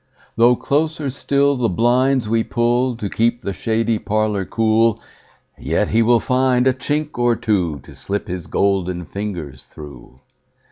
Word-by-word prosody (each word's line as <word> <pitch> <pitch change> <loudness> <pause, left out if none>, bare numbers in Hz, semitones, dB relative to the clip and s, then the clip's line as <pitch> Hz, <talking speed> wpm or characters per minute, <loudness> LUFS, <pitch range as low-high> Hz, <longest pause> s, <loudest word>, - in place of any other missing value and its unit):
Though 120 +2 +5
closer 150 +1 -1
still 140 +1 +1
the 120 -2 0
blinds 125 +4 +2
we 115 +1 +1
pullTo 120 -2 0
keep 120 +4 0
the 100 - -3
shady 110 +4 -1
parlour 105 -2 -1
cool, 115 +1 +2 0.6
Yet - - -1
he 115 - +2
will 120 +1 +4
find 125 0 +1
a 130 - +4
chink 145 +2 -3
or 120 -1 +3
twoTo 90 -11 -2
slip 100 +1 -4
his 90 -2 -5
golden 90 -3 0
fingers 85 -10 -6
through. 70 -4 -13
115 Hz, 140 wpm, -19 LUFS, 100-125 Hz, 0.6 s, Though